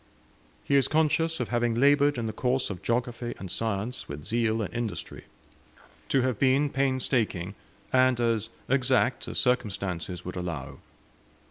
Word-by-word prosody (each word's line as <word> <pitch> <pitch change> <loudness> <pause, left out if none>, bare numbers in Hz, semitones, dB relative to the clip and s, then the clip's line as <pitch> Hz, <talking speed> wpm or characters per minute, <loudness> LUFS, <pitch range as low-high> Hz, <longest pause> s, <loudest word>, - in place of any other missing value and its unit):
He 140 - +1
is 135 - +3
conscious 160 +1 +2
of 125 - -2
having 120 -1 +1
laboured 145 +2 +4
in 115 - -2
the 110 - -3
course 130 -2 0
of 90 - -7
geography 120 0 -2
and 95 -3 -7
science 110 +3 -2
with 70 +1 -6
zeal 115 +1 +1
and 100 - -6
industry, 115 -2 -4 0.8
to 135 - +3
have 130 -5 0
been 140 +2 +3
painstaking, 125 -8 0 0.4
and 130 -1 +4
as 115 -2 +1 0.2
exact 130 -1 +2
as - - -3
circumstances 95 -8 -1
would 90 - -5
allow. 85 -7 -5
120 Hz, 145 wpm, -27 LUFS, 105-130 Hz, 0.8 s, laboured